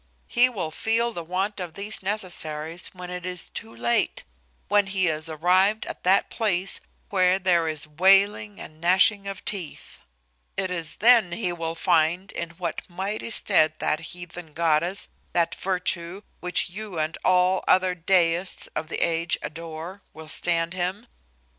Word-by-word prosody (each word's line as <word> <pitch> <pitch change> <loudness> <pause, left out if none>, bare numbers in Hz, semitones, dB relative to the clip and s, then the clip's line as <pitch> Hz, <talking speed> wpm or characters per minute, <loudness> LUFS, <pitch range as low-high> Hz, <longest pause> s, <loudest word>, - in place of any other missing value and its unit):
He 250 +1 +4
will 185 -10 -4
feel 230 +6 0
the 170 - -5
want 190 +5 -2
of 175 -3 -6
these 205 +2 -2
necessaries 175 -5 -3
when 180 -1 -9
it 180 0 -5
is 180 -1 -2
too 115 +1 -6
late, 120 0 +1 0.4
when 205 0 +3
he 190 -1 +1
is 155 0 0
arrived 185 +7 +2
at - - -7
that 190 +2 +3
place 195 -4 0 0.3
where 185 -1 +4
there 175 -3 +2
is 155 -2 -2
wailing 195 +5 +3
and 155 0 -10
gnashing 195 +3 +4
of 195 0 -7
teeth. 185 -7 -5 0.6
It 185 -1 -1
is 170 -3 -3
then 225 -6 +5
he 180 -3 -1
will 165 -1 -4
find 170 +2 +1
in 170 - -4
what 170 -3 -3
mighty 195 +6 -4
stead 155 -8 +3
that 155 - 0
heathen 175 -1 -8
goddess, 170 +3 +1 0.3
that 170 -1 +2
virtue, 180 0 -2 0.2
which 180 0 0
you 205 -2 -6
and 155 +1 -1
all 185 +1 +3
other 185 0 +4
deists 180 0 +1
of 155 - -3
the - - -3
age 170 +1 0
adore, 165 +4 -7
will 160 -1 -10
stand 170 +1 0
him. 185 +5 -3
180 Hz, 155 wpm, -25 LUFS, 165-195 Hz, 0.6 s, then